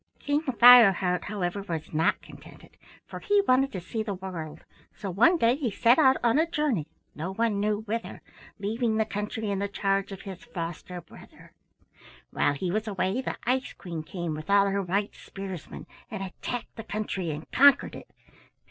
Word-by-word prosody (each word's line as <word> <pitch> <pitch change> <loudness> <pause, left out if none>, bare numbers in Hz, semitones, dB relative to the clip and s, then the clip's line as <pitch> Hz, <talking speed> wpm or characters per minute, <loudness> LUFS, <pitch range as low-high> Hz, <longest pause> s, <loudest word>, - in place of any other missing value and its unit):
"King 290 +1 0
Fireheart, 230 - +6
however, 200 -1 -3
was 165 -6 -6
not 160 +1 +1
contented, - - -15 0.3
for - - -8
he 410 -1 +2
wanted 270 +2 +3
to 190 - -3
see 200 +6 -4
the 210 -2 -3
world, 165 -5 -7 0.3
so 195 - -5
one 240 - +4
day 235 -3 +3
he 275 -4 -2
set 235 +6 +3
out 265 -3 +5
on 240 +5 +3
a 325 +1 +1
journey, 290 - 0 0.3
no 170 +5 -5
one 225 -2 0
knew 210 +1 0
whither, 225 +2 -5 0.3
leaving 220 +2 -1
the 220 - +2
country 210 0 -4
in 195 - -1
the 200 - -1
charge 195 0 -1
of 195 - -8
his 190 +1 -9
foster 175 -4 -6
brother. 165 - -16 0.8
"While 145 - +1
he 175 +5 -3
was 215 +3 -2
away 195 +3 -1
the - - -4
Ice 255 +2 0
Queen 170 -4 -6
came 170 0 -5
with 155 +3 -8
all 200 0 +5
her 200 0 0
white 195 +3 -1
spearsmen 190 -4 -8 0.2
and 215 -4 -5
attacked 225 +5 -6
the 225 - -6
country 205 -5 -3
and 150 +1 -5
conquered 280 +1 +5
it. - - -10
200 Hz, 180 wpm, -27 LUFS, 180-235 Hz, 0.8 s, Fireheart